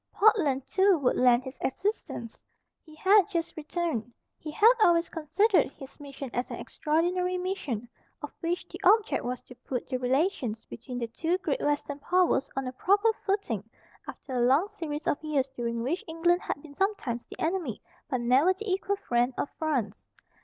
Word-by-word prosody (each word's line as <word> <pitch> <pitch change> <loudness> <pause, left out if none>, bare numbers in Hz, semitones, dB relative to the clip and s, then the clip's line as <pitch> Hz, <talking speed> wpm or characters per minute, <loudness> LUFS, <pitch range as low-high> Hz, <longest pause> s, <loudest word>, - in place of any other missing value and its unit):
Portland 330 -12 +3
too 380 +3 +4
would 270 -4 +1
lend 250 0 +4
his 260 0 -9
assistance. 265 - -3 0.4
He 310 -2 -15
had 390 +4 +5
just 335 -4 -2
returned. 310 -6 -3 0.3
He 310 - -7
had 440 +10 +6
always 340 -2 +4
considered 355 - +2
his 270 0 -12
mission 275 -2 -8
as 245 +1 -2
an - - -5
extraordinary 360 +4 0
mission, 300 - -3 0.4
of - - -5
which 345 +1 -2
the 360 - -9
object 425 +4 +4
was 250 0 -3
to - - -13
put 250 0 -5
the 255 - -1
relations 255 - 0
between 245 +2 -8
the 240 - -1
two 325 +10 -1
great 480 +6 -2
Western 290 0 -1
powers 360 -2 +2
on 270 0 -2
a 255 - -3
proper 405 - +3
footing 385 - 0 0.4
after 265 - -8
a 250 - 0
long 270 +11 +3
series 315 -7 -5
of 290 - 0
years 290 -4 0
during 235 -1 -2
which 315 +9 -1
England 345 +2 +2
had 285 - -4
been 300 -2 -12
sometimes 285 - -1
the - - -11
enemy, 320 - -1 0.3
but 255 -4 -1
never 265 +10 +4
the 420 0 -4
equal 390 +1 0
friend, 245 -7 0
of - - -1
France. 255 -10 -2
305 Hz, 175 wpm, -28 LUFS, 255-365 Hz, 0.4 s, had